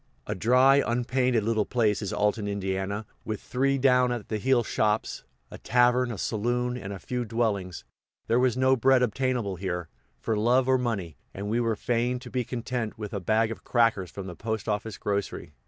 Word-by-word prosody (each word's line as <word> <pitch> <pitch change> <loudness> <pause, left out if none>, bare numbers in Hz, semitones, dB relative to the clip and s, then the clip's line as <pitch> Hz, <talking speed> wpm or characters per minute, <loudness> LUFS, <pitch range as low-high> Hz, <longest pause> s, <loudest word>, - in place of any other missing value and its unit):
A - - -2
dry, 130 +7 +5
unpainted 125 -1 +1
little 110 0 +1
place 110 -2 +1
is 100 - -3
Alton, 105 0 0
Ind., 100 +1 -2 0.2
with 110 -1 -4
three 135 +2 0
down 125 -2 +4
at 120 -4 -4
the 110 - -2
heel 130 +1 +3
shops, 105 0 -1 0.3
a - - -9
tavern, 125 +1 +3
a 115 - -5
saloon, 120 +5 -1
and 100 -5 -6
a 100 - -5
few 125 +5 -3
dwellings; 100 - -2 0.4
there 115 +2 +2
was 125 -1 +2
no 130 0 +4
bread 130 0 +4
obtainable 120 -4 -1
here, 90 -2 -4 0.3
for 110 - -1
love 120 +4 +3
or 130 -1 +3
money, 100 - -3 0.2
and 100 +2 -4
we 115 - +1
were 115 -2 +1
fain 120 +3 0
to 125 -1 -10
be 125 -1 0
content 120 -1 -4
with 105 -1 -6
a 100 - -2
bag 110 +4 +1
of 115 - -7
crackers 115 -7 +2
from 100 - -7
the 90 -2 -7
postoffice 110 0 -3
grocery. 100 -1 -3
115 Hz, 190 wpm, -27 LUFS, 105-125 Hz, 0.4 s, dry